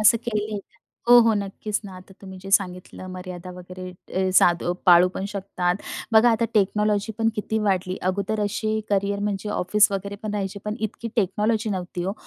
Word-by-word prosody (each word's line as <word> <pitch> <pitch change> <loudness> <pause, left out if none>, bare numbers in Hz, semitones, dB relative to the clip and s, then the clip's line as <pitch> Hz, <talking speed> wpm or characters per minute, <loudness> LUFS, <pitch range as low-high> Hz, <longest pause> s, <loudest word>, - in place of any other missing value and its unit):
असं 215 +2 +6
केलंय 215 -2 -2
का? 200 - -17 0.3
हो, 245 0 +10
हो, 230 -1 +4
नक्कीच 205 +1 -3
ना. 195 -2 -9
आता 185 +1 -14
तुम्ही 190 -1 -10
जे 195 - -8
सांगितलं 185 -1 0
मर्यादा 180 -1 -7
वगैरे, 180 0 -9 0.3
अ, 190 0 +1
साधू 175 -1 +4
पाळू 180 0 +7
पण 190 - -3
शकतात. 190 -3 -1 0.4
बघा 225 +2 +6
आता 225 0 +1
टेक्नॉलॉजीपण 210 +2 +1
किती 220 +1 -2
वाढली. 185 -2 0
अगोदर 200 +3 -1
असे 215 +1 -1
करियर 200 0 +1
म्हणजे 205 0 -3
ऑफिस 210 +2 +3
वगैरे 200 +1 -3
पण 215 -1 -3
राहायचे, 200 -1 -3
पण 210 0 -2
इतकी 220 +2 -4
टेक्नॉलॉजी 215 +2 +1
नव्हती 180 -2 -4
हो. 195 - -1
200 Hz, 175 wpm, -24 LUFS, 185-215 Hz, 0.4 s, हो